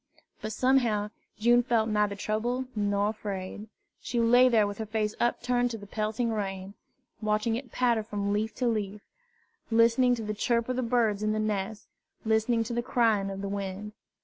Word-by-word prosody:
But 215 - -4
somehow 225 -4 +2 0.3
June 240 +3 +4
felt 230 -2 +1
neither 210 -2 +1
troubled 235 +5 -1
nor 205 0 +1
afraid. 205 -1 -5 0.3
She 240 - -2
lay 245 +2 +6
there 220 -3 +4
with 205 0 -5
her 220 - -2
face 215 0 -1
upturned 245 +1 +1
to 230 - -5
the 205 - -11
pelting 215 +3 -2
rain, 195 -2 -4 0.5
watching 215 +1 +1
it 245 -1 -6
patter 240 -3 +2
from 205 -2 -2
leaf 215 +2 -1
to 250 - 0
leaf, 210 -2 -2 0.7
listening 235 +2 +4
to 230 - -6
the 215 0 -3
chirp 235 +2 0
of 255 - 0
the - - +1
birds 230 -4 +1
in 215 0 +1
the 215 - -1
nests, 210 0 -2 0.4
listening 225 +1 +2
to 230 +2 -5
the 240 - 0
crying 225 -5 +1
of 195 0 -5
the - - -2
wind. 200 +1 -5
220 Hz, 180 wpm, -28 LUFS, 205-235 Hz, 0.7 s, lay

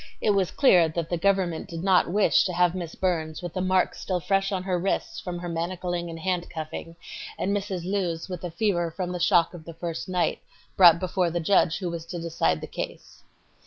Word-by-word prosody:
It 210 - +2
was 195 -3 +2
clear 180 - +5
that 165 +1 -4
the - - +2
government 190 -3 +1
did 165 0 -6
not 190 -2 +4
her - - -6
wish 205 +2 +4
to 185 - -2
have 175 0 +3
Miss 175 -3 -5
Burns 165 -3 -2
with 175 -2 -5
the 185 - -2
marks 185 0 +1
still 185 -2 -1
fresh 195 +2 0
on 185 -2 -2
wrists 185 0 -1
from 180 -1 -5
her 175 0 -6
manacling 175 +1 -3
and 165 0 -7
handcuffing, 165 -2 -4 0.4
and 200 +2 0
Mrs. 195 -3 -3
Lewes 180 -4 -2
with 180 -2 -6
a 175 - -3
fever 175 -2 0
from 180 +2 -4
the 180 - -4
shock 170 0 +3
of 170 -3 -10
the 165 0 -10
first 165 +1 -5
night, 180 -1 0 0.4
brought 170 -3 +8
before 180 -1 0
the 175 +1 -2
judge 165 -1 +3
who 180 -3 -3
was 165 -1 -6
to 175 - -5
decide 160 - 0
the - - -4
case. - - -7
175 Hz, 215 wpm, -26 LUFS, 165-185 Hz, 0.4 s, brought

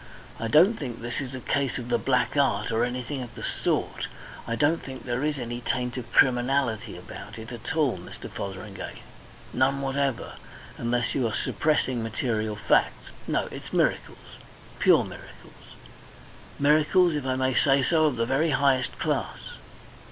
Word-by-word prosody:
I 115 - -2
don't 175 - +5
think 125 -6 -5
this 120 +4 -3
is 130 -1 -6
a - - -5
case 140 0 0
of 120 -1 -6
the 120 -1 +2
black 125 +1 +1
art 140 -4 +2
or 115 +1 +2
anything 125 +3 -3
of 120 -1 -8
the - - -8
sort. - - -1 0.4
I 115 - -1
don't 145 +7 +2
think 130 -1 -8
there 125 +2 -2
is 150 -1 0
any 120 -1 -4
taint 125 0 -1
of 120 -2 -6
criminality 125 -2 +2
about - - -10
it 110 +1 -8
at 120 +5 -5
all, 140 - +2
Mr. 90 - -9
Fotheringay 95 0 -7 0.5
none 135 +2 +2
whatever, 135 -1 -1 0.4
unless 120 -1 0
you 130 -4 +1
are 110 - -3
suppressing 130 -6 +1
material 110 -1 -1
facts. 105 - +1 0.2
No, - - +1
it's - - -8
miracles - - -1 0.4
pure - - +5
miracles - - -13 0.8
miracles, 155 +5 +4
if 145 -3 -2
I 130 - +1
may 130 0 +1
say 135 +3 +4
so, 160 +2 +3
of 145 -4 +2
the 115 -1 0
very 135 +7 +2
highest 135 -2 +2
class." - - -1
130 Hz, 165 wpm, -26 LUFS, 120-140 Hz, 0.8 s, don't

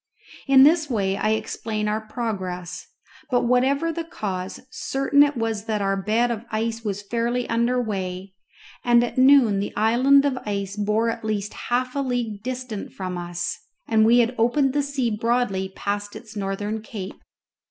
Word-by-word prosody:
In 270 -1 +7
this 305 +1 +4
way 195 -5 0
I 215 +2 +1
explain 220 -1 -3
our 215 +1 0
progress; 200 -6 -5 0.4
but 245 -2 +2
whatever 265 +6 +2
the 335 - -3
cause, 190 - -5
certain 275 +1 +1
it 290 -2 +3
was 225 -2 -2
that 215 -2 -1
our 195 -1 +1
bed 220 +5 +1
of 230 -1 -4
ice 225 +1 -2
was 205 -2 -3
fairly 235 +3 -1
under 235 +2 +1
weigh, 190 -4 -4 0.5
and 240 0 +5
at 245 - -2
noon 260 -6 +6
the 200 - -4
island 260 +6 +4
of 265 -3 0
ice 200 -1 -3
bore 210 +2 +1
at - - -7
least 210 -1 -2
half 250 +2 -2
a - - 0
league 245 -6 -2
distant 250 -3 -5
from 185 -2 -5
us, 175 0 -3 0.3
and 220 -1 +4
we 230 +2 +5
had 240 0 +3
opened 260 +4 +2
the 290 - +2
sea 275 -4 -1
broadly 215 -4 0
past 205 0 -3
its 220 -2 -11
northern 205 +2 -3
cape. 205 -3 -8
225 Hz, 170 wpm, -23 LUFS, 205-250 Hz, 0.5 s, In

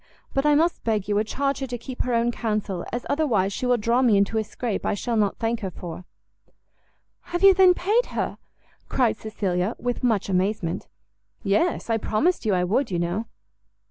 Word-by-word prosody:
But 270 +2 +1
I 295 - +5
must 330 +3 +1
beg 215 -4 0
you 210 - 0
would 210 +1 +1
charge 275 +3 -1
her 270 - -3
to 245 0 -4
keep 250 +2 -6
her 250 -2 0
own 235 +1 +2
counsel, 210 -6 -2
as 240 +1 -4
otherwise 220 -11 +1
she 250 - -2
will 250 -1 +3
draw 235 +3 +2
me 235 -6 +4
into 200 +3 +2
a - - 0
scrape 220 +1 -4
I - - 0
shall 235 +3 -2
not 205 -3 +1
thank 230 0 -1
her 195 -4 -3
for." 175 0 -8 1.2
"Have 350 +2 -3
you, 390 0 +9
then, 370 -1 +6
paid 425 +8 +1
her?" - - -3 0.5
cried 245 -4 +2
Cecilia, 195 -2 -2
with 245 +1 -3
much 225 -5 +1
amazement. 185 -2 -1 0.6
"Yes; 210 - +1
I 225 -1 +1
promised 225 - 0
you 200 - +3
I 180 - +1
would, 230 +9 +1
you 180 - -1
know." 175 +6 -2
225 Hz, 200 wpm, -24 LUFS, 200-255 Hz, 1.2 s, you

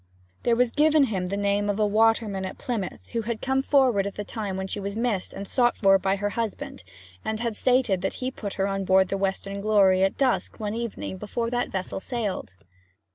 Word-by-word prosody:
There 235 - +2
was 245 0 +2
given 305 +1 +4
him 195 -8 -1
the 200 +2 -2
name 205 0 +1
of 205 +1 -1
a 215 - +4
waterman 215 -2 +2
at 190 - -5
Plymouth, 235 -8 -4
who 230 - -1
had 225 0 -3
come 265 0 +1
forward 255 -8 +3
at 200 - -6
the 205 - -4
time 205 -3 -4
that 190 0 -4
she - - -1
was 200 +1 -4
missed 230 -5 -1
and 200 - -7
sought 240 +2 +2
for 195 -1 +5
by 190 +1 +1
her 205 +1 -2
husband, 220 - -4 0.4
and 220 0 -2
had 235 -2 -2
stated 245 -6 +2
that 190 - -2
he 255 0 -3
put 205 -6 -6
her 195 0 0
on 195 0 -2
board 190 0 +4
the - - 0
Western 195 +1 -2
Glory 200 -3 +4
at 195 - +1
dusk 260 -3 0
one 210 -1 -2
evening 230 -4 -4
before 230 +4 -3
that 245 0 0
vessel 190 0 -3
sailed. 205 - -4
205 Hz, 220 wpm, -26 LUFS, 195-235 Hz, 0.4 s, for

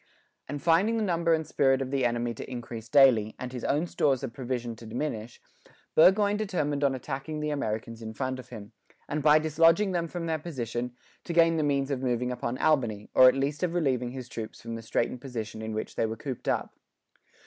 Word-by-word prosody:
And 145 +2 -4
finding 175 +9 +3
the 220 - 0
number 170 -3 +1
and 160 -1 +2
spirit 135 -3 +2
of 135 -1 -3
the 135 -2 +1
enemy 120 0 0
to 115 - -8
increase 115 -2 -7
daily, 115 -5 +5
and 125 0 -6
his 125 - -6
own 150 +4 +1
stores 140 -5 +1
of 125 -4 -4
provision 120 -2 -4
to 115 - -11
diminish, 115 -1 -4 0.5
Burgoyne 205 +5 +5
determined 150 -9 -1
on 135 -1 +2
attacking 140 +4 -5
the 150 0 -2
Americans 115 -4 -3
in 110 0 -7
front 130 -1 -2
of 125 -1 -11
him, 110 -3 -9 0.4
and 150 +1 -2
by 150 +1 +6
dislodging 165 +5 +3
them 170 -2 -1
from 170 0 -5
their 160 -1 -1
position, 125 -6 -4 0.3
to 170 - -3
gain 165 -1 +4
the 155 - +1
means 140 -1 0
of 130 -2 -1
moving 125 -1 0
upon 125 0 -3
Albany, 120 -10 +1
or 130 - +8
at - - 0
least 140 +2 -1
of 175 -1 -1
relieving 130 -7 +1
his 130 -1 -7
troops 115 -2 -7
from 115 0 -7
the 115 - -5
straitened 115 +2 -1
position 115 -5 -6
in 110 0 -4
which 110 0 -4
they 115 - +1
were 110 +1 -5
cooped 130 0 -6
up. - - -1
135 Hz, 215 wpm, -28 LUFS, 120-155 Hz, 0.5 s, or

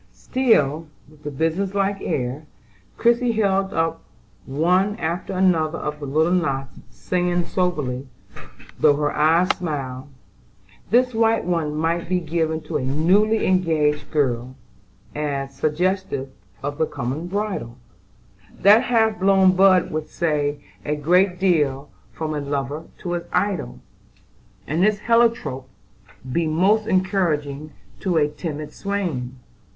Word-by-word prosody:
Still 165 - +1 0.2
with 150 0 -20
the 150 - -5
business 165 +7 -1
like 200 0 0
air, 130 +4 -3 0.5
Christie 235 0 +2
held 195 -3 +1
up 165 0 -1 0.5
one 180 +8 +2
after 170 +2 -3
another 170 -4 +2
of 150 0 -4
the 145 - -6
little 155 +5 +2
knots, 135 -7 -1
saying 175 -1 -1
soberly, 150 -9 -2 0.7
though 145 -2 +5
her 145 0 0
eyes 165 +4 +3
smiled: 135 -5 -5 0.8
"This 250 +4 +3
white 225 -2 +2
one 165 -4 -1
might 165 +2 -1
be 185 -1 +2
given 160 -1 -1
to 155 - -3
a - - -3
newly 185 +11 +2
engaged 160 -5 +1
girl, 130 -3 -1 0.6
as 140 -2 -3
suggestive 155 -1 -1 0.3
of 145 +1 -4
the 160 - +2
coming 135 +8 -4
bridal. 190 - -3 0.8
That 210 +3 +7
half 220 -3 +2
blown 190 -1 +4
bud 185 -1 +4
would 155 0 -3
say 145 -3 -1 0.2
a 150 - -1
great 180 +5 +2
deal 150 -7 +1 0.2
from 155 -1 -4
a 150 - -2
lover 140 +2 -3 0.2
to 175 - -3
his 175 -1 -3
idol; 180 - -1 0.9
and 160 +4 -1
this 210 +1 +2
heliotrope 230 - +1 0.6
be 165 +3 0
most 195 +7 +2
encouraging 160 -7 0 0.3
to 180 -4 0
a 150 -2 +3
timid 150 -1 -6
swain. 165 -11 -3
165 Hz, 130 wpm, -22 LUFS, 145-190 Hz, 0.9 s, That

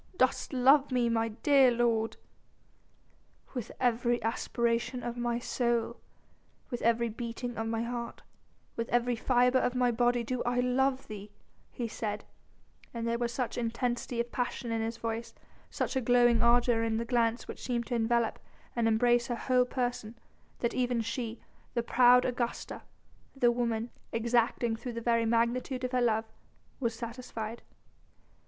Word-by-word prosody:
Dost 255 0 +1
love 270 +2 +5
me, 245 -2 +2
my 225 0 +1
dear 270 +4 +4
lord?" 230 -2 +1 1.4
"With 245 -5 -5
every 240 -1 +2
aspiration 235 +1 -1
of 240 0 -3
my 240 -1 -1
soul, 235 -1 -1 0.7
with 245 - -3
every 235 +1 +2
beating 235 +2 -5
of 225 0 -3
my 225 0 -1
heart, 235 0 -5 0.5
with 230 0 -3
every 240 0 +2
fibre 250 +2 +3
of 250 - 0
my 250 -1 +3
body 240 +1 +2
do 250 +2 -2
I 245 0 0
love 260 +2 +1
thee," 210 -1 -8 0.4
he 240 - -4
said, 210 -1 -4 0.7
and 230 0 -2
there 235 0 0
was 240 -1 -1
such 245 -1 -2
intensity 240 +1 -2
of 235 0 -2
passion 245 -1 -3
in 225 0 0
his 225 +1 -3
voice, 230 0 -4 0.3
such - - -2
a 265 - +2
glowing 240 -1 +4
ardour 240 -1 +4
in 225 -1 0
the 230 - -2
glance 235 -1 +1
which - - -8
seemed 240 -2 -1
to 245 - -4
envelop 235 0 +1 0.4
and 235 -1 +2
embrace 240 +2 +3
her 240 - -1
whole 250 +1 +2
person, 245 -3 -3 0.4
that 235 - 0
even 245 -2 0
she 230 0 -4 0.4
the 235 - +1
proud 250 +1 +5
Augusta, 240 -1 -3 0.5
the 245 -3 +4
woman 235 -1 -1 0.2
exacting 235 0 +1
through 240 +2 -6
the 230 - -3
very 230 -1 +1
magnitude 240 +3 0
of 250 - -1
her 250 -1 +1
love 225 -2 +2 0.5
was 235 -4 -1
satisfied. 230 -1 -6
235 Hz, 155 wpm, -30 LUFS, 230-245 Hz, 1.4 s, love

